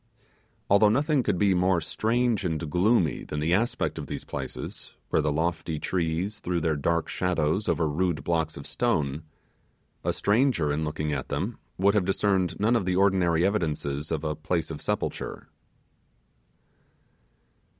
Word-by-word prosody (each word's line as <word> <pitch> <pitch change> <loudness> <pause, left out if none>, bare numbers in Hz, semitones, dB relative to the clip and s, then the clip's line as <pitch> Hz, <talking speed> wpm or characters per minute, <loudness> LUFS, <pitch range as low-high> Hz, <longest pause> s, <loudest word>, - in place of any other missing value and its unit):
Although 100 +1 +5
nothing 145 +5 +2
could 100 - 0
be 100 0 +3
more 90 0 +3
strange 115 +6 0
and 80 -3 -2
gloomy 90 -2 +2
than 75 - -4
the 80 +3 +1
aspect 115 +6 0
of - - -6
these - - -5
places, - - -6
where - - +2
the 75 0 0
lofty 80 +1 -1
trees 90 +5 -1
threw 90 -3 -1
their 80 -1 +1
dark 85 +3 0
shadows 90 +2 0
over 80 - +1
rude 80 -1 0
blocks 80 -2 -1
of 70 - -8
stone, 75 - 0 0.8
a - - +1
stranger 105 - +2
looking 75 0 -2
at - - -4
them - - -3 0.2
would 100 +2 +4
have 105 -4 +2
discerned 95 -2 +1
none 110 +4 +3
of 110 -6 +1
the 90 0 +1
ordinary 90 -3 +3
evidences 75 -7 -1
of 80 -2 -1
a 75 -1 -1
place 80 +1 -2
of 75 - -6
sepulture. - - -3
85 Hz, 150 wpm, -27 LUFS, 80-100 Hz, 0.8 s, Although